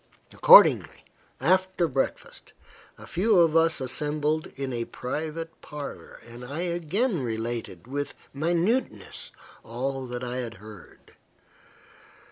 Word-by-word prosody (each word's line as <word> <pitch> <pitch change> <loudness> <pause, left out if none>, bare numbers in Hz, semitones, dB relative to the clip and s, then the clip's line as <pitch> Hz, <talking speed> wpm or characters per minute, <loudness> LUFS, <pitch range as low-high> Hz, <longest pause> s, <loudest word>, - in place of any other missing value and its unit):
Accordingly, - - +7 0.3
after 185 -1 +2
breakfast, 135 -2 -4 0.4
a - - -12
few 205 +3 +2
of 165 -2 +4
us 165 -1 +3
assembled 150 +4 -1
in 135 -1 -4
a 115 -1 -2
private 160 +7 -5
parlour, 150 -2 -8
and 120 +1 -10
I 140 +7 -5
again 175 - -1
related, 115 -6 -4
with 145 +3 -4 0.2
minuteness, 170 - -1 0.3
all 130 +3 -4
that 125 0 -5
I 125 0 -4
had 120 -3 -5
heard. 105 -3 -15
145 Hz, 110 wpm, -26 LUFS, 125-170 Hz, 0.4 s, Accordingly